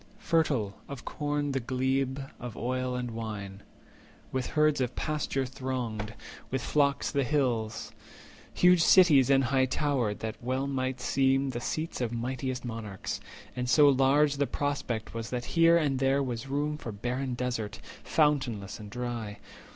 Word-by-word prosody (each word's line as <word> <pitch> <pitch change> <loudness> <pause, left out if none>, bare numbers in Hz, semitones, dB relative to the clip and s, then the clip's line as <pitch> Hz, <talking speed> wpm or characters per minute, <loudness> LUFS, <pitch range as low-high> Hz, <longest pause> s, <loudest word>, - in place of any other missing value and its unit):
Fertil 150 - +1 0.2
of 140 -4 -7
corn 145 -1 -2
the 135 - 0
glebe, 130 +2 0 0.2
of 120 -2 -7
oil, 130 +1 -1
and 125 -1 -3
wine; 105 -3 -6 0.7
With 130 -1 -1
herds 150 -1 +2
the 130 - +2
pasture 140 +1 -2
thronged, 120 -4 -4 0.3
with 130 -1 -2
flocks 140 -2 +1
the 140 -1 +1
hills; 120 -6 -1 0.6
260 - - -7
Huge 180 -1 +6
cities 150 -10 +6
and 135 -1 +5
high 130 +1 +3
towered, 130 -6 0
that 110 0 -5
well 130 +2 -1
might 130 -2 -2
seem 135 +1 +2
The 120 -1 -4
seats 155 0 -3
of 120 -2 -1
mightiest 125 +2 -3
monarchs; 110 -4 -5 0.4
and 125 0 -2
so 145 +1 +7
large 140 +2 +4
The 140 -1 +1
prospect 135 -6 -2
was 115 -2 -4
that 125 -1 -3
here 165 0 +6
and 140 -5 +1
there 135 +1 +2
was 120 -1 -4
room 150 +2 -1
For 115 - -5
barren 125 +5 -3
desert, 120 -5 -3 0.2
fountainless 130 -10 +1
and 105 -1 -9
dry. 120 -3 -4
130 Hz, 155 wpm, -29 LUFS, 120-140 Hz, 0.7 s, so